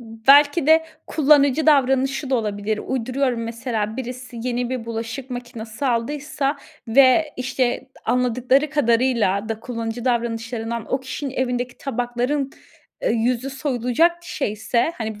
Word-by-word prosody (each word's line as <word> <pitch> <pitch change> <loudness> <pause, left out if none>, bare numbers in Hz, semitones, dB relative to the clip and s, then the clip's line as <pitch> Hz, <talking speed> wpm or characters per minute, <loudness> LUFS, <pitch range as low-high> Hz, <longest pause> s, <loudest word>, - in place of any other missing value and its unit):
Belki 275 +7 +4
de 320 +1 +5 0.2
kullanıcı 290 0 +3
davranışı 270 -1 +2
da - - +3
olabilir. 210 -2 -1
Uyduruyorum, 255 -1 -1
mesela 230 -1 -3
birisi 250 -1 -7
yeni 245 0 -2
bir 255 -3 -3
bulaşık 230 +3 -5
makinesi 240 0 -5
aldıysa 280 +4 -1 0.3
ve, 275 +5 +5
işte, 255 +1 0 0.3
d - - -18
anladıkları 250 +4 +2
kadarıyla 235 -7 +2
da 225 0 -3
kullanıcı 230 -1 -5
davranışlarından 235 -1 -2
o 260 - +1
kişinin 265 +1 -5
evindeki 250 -1 -2
tabakların, 250 +2 -2 0.5
eee, - - +1
yüzü 245 +3 0
soyulacak 265 +3 +1
şeyse, 235 +1 -1
hani, 220 -2 -4
250 Hz, 120 wpm, -22 LUFS, 230-270 Hz, 0.5 s, de